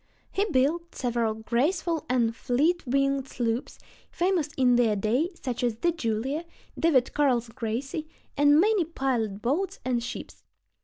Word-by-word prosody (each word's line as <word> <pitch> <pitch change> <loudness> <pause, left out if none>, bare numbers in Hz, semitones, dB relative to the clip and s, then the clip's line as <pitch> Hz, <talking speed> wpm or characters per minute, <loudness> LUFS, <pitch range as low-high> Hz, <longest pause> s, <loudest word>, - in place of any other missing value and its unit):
He 400 - +1
built 335 +1 0
several 235 -3 0
graceful 315 - 0
and 235 -3 +2
fleet 305 +11 +1
winged 275 +1 +1
sloops, 235 0 -2 0.3
famous 350 -4 0
in 250 -2 +4
their 230 -3 +3
day, 230 - +1
such 250 -6 -4
as 240 -2 +1
the 345 +10 +1
Julia, 265 +1 -2 0.3
David 280 -7 +2
Carl's 250 -5 +2
Gracie, 260 +7 -4 0.3
and 290 +1 +5
many 415 0 +4
pilot 245 -10 -2
boats 365 +10 -1
and 245 -2 0
ships. - - -7
265 Hz, 140 wpm, -27 LUFS, 235-320 Hz, 0.3 s, and